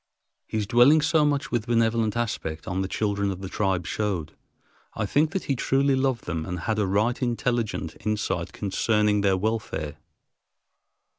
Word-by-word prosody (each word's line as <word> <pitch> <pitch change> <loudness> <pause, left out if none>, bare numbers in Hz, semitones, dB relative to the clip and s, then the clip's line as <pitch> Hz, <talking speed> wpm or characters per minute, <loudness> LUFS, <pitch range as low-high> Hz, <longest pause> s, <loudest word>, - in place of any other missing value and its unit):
His 110 -1 -2
dwelling 125 +8 +6
so 155 +1 +3
much 145 -1 0
with 120 -3 -1
benevolent 115 -1 +1
aspect 85 -9 -3
on 95 +1 -1
the 95 - -1
children 100 0 -1
of 95 -1 -5
the 95 - -5
tribe 95 -3 -1
showed, 90 -3 -2 0.6
I - - -1
think, 150 +9 +2
that 190 +3 -3
he 140 - -1
truly 135 +2 +2
loved 130 -3 0
them 85 -2 -3
and 90 +1 -5
had 110 +4 -1
a 105 - +1
right 105 +7 +1
intelligent 120 -7 -1
insight 105 +1 -1
concerning 105 +1 +1
their 95 -1 +3
welfare. 95 -8 -2
105 Hz, 160 wpm, -25 LUFS, 95-120 Hz, 0.6 s, dwelling